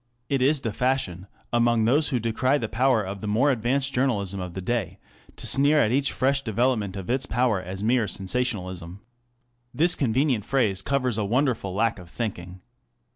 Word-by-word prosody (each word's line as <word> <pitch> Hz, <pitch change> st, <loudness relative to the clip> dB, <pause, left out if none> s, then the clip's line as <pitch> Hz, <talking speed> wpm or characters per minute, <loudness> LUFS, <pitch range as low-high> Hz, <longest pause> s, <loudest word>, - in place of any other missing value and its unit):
It 135 Hz, -2 st, 0 dB
is 140 Hz, +2 st, +3 dB
the 115 Hz, -5 st, -3 dB
fashion, 105 Hz, -9 st, -1 dB, 0.3 s
among 120 Hz, -1 st, +3 dB
those 145 Hz, +6 st, +2 dB
who 130 Hz, -4 st, 0 dB
decry 115 Hz, +5 st, +1 dB
the 115 Hz, -, -3 dB
power 125 Hz, -1 st, +2 dB
of 95 Hz, +1 st, -6 dB
the 105 Hz, -, -4 dB
more 120 Hz, +8 st, +3 dB
advanced 135 Hz, +3 st, 0 dB
journalism 100 Hz, -7 st, 0 dB
of 90 Hz, -2 st, -6 dB
the -, -, -3 dB
day, 95 Hz, -2 st, -2 dB, 0.4 s
to -, -, -7 dB
sneer 145 Hz, +3 st, +4 dB
at 110 Hz, -, +2 dB
each 140 Hz, +2 st, +2 dB
fresh 135 Hz, +1 st, +1 dB
development 110 Hz, -4 st, 0 dB
of 95 Hz, -, -7 dB
its 130 Hz, +2 st, -1 dB
power 115 Hz, -5 st, +1 dB
as 95 Hz, +2 st, -7 dB
mere 115 Hz, -1 st, +2 dB
sensationalism. 95 Hz, -3 st, -3 dB, 0.7 s
This 170 Hz, +3 st, +4 dB
convenient 130 Hz, -2 st, +1 dB
phrase 110 Hz, -8 st, 0 dB
covers 130 Hz, -5 st, -1 dB
a -, -, 0 dB
wonderful 115 Hz, -4 st, 0 dB
lack 115 Hz, 0 st, +1 dB
of 90 Hz, -2 st, -12 dB
thinking. 90 Hz, -4 st, -5 dB
115 Hz, 180 wpm, -25 LUFS, 100-130 Hz, 0.7 s, sneer